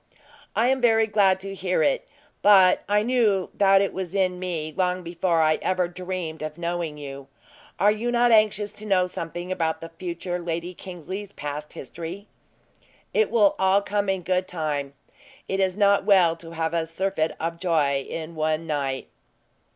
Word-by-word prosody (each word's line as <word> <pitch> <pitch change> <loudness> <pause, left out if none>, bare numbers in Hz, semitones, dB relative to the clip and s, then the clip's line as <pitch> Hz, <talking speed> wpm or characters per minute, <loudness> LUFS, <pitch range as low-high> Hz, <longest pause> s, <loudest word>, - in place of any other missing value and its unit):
"I 230 +4 +3
am 265 0 +1
very 225 -2 +4
glad 200 -3 +3
to 195 0 -6
hear 185 -1 0
it; - - +1 0.3
but 190 -3 +6
I 210 +1 +3
knew 220 -6 +1
that 195 -1 +5
it 200 - -1
was 190 0 -5
in 185 -2 +1
me 165 -4 -4
long 180 -1 0
before 170 -1 +1
I 155 0 +2
ever 185 -1 +1
dreamed 180 -3 -5
of 155 0 -5
knowing 170 -3 -3
you. 140 -2 -8 0.5
Are 205 +1 +4
you 220 +3 -2
not 240 0 +3
anxious 215 -2 +3
to 215 - -8
know 185 -3 +3
something 175 0 -6
about 165 -3 -1
the 165 - -8
future 175 +1 -5
Lady 170 +1 -4
Kingsley's 185 +3 -7
past 150 +1 -6
history?" 170 +8 -8 0.9
"It 445 - +3
will 210 -4 +4
all 190 +1 +3
come 205 0 -1
in 190 -2 -1
good 185 +1 0
time; 150 -5 -3 0.5
it 195 - -2
is 190 0 +1
not 200 -1 +4
well 180 -5 +4
to 165 0 -11
have 165 0 -2
a 165 -1 0
surfeit 165 -1 -1
of 165 +1 -3
joy 155 -6 +1
in 165 0 -5
one 155 0 -1
night. 140 -4 -2
180 Hz, 175 wpm, -24 LUFS, 165-195 Hz, 0.9 s, but